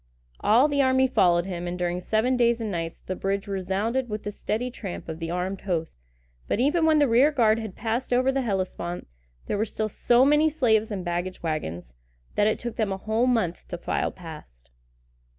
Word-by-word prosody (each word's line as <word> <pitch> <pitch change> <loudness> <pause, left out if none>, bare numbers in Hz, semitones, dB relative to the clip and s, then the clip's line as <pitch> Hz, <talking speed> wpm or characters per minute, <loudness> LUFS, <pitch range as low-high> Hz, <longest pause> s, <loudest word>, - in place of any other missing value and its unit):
All 240 +7 +5
the 285 -1 +1
army 260 0 +4
followed 175 -8 +3
him, 175 -2 -4
and 175 +1 -3
during 180 0 -1
seven 220 +7 +1
days 235 -1 +3
and 220 -2 -3
nights 165 -2 -3
the 185 - -3
bridge 195 +1 -2
resounded 200 +6 -1
with 210 0 -4
the 205 - -3
steady 225 +4 -3
tramp 200 -7 -7
of 160 0 -6
the 165 -1 -4
armed 180 +2 -2
host; 165 - -3 0.5
but, - - 0
even 320 +6 +3
when 315 -1 +5
the 290 -1 +4
rear 255 +6 +5
guard 225 -6 +3
had 220 -4 -6
passed 230 +4 -2
over 255 +2 +3
the 270 0 0
Hellespont, 185 -5 -3 0.4
there 205 - -2
were - - +3
still 215 0 -3
so 240 +4 +3
many 295 +2 +4
slaves 225 -8 +2
and 195 -4 -4
baggage 175 +1 -3
wagons, 90 - -4 0.4
that 205 - +3
it 215 - +1
took 240 -1 -6
them 215 -3 0
a 190 - -2
whole 220 +5 0
month 220 -9 0
to 175 - -5
file - - -1
past. 65 - -12
210 Hz, 205 wpm, -26 LUFS, 180-245 Hz, 0.5 s, All